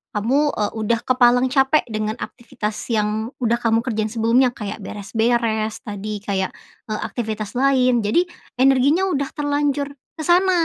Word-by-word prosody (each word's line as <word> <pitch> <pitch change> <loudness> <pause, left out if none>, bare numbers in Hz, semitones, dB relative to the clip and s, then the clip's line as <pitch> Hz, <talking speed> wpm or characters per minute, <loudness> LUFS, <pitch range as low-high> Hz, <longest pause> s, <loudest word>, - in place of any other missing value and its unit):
kamu, 270 +8 +1
eee, 210 -1 -1
udah 225 +2 +1
kepalang 250 0 +3
capek 270 +2 +3
dengan 215 0 -2
aktivitas 220 -4 -5 0.2
yang 215 +1 0
udah 235 0 +2
kamu 230 -1 +1
kerjain 220 -3 -1
sebelumnya, 230 +3 +3
kayak 210 -1 -5
beres-beres 220 +1 -1
tadi 210 -2 -5
kayak, 190 -2 -1 0.4
eee, 215 -1 -3
aktivitas 215 -3 -4
lain. 255 -2 +3
Jadi 220 +11 +2 0.3
energinya 270 +6 +4
udah 280 -7 -1
terlanjur 290 -1 0 0.3
ke - - -2
sana. 365 +2 +4
235 Hz, 140 wpm, -21 LUFS, 215-270 Hz, 0.4 s, energinya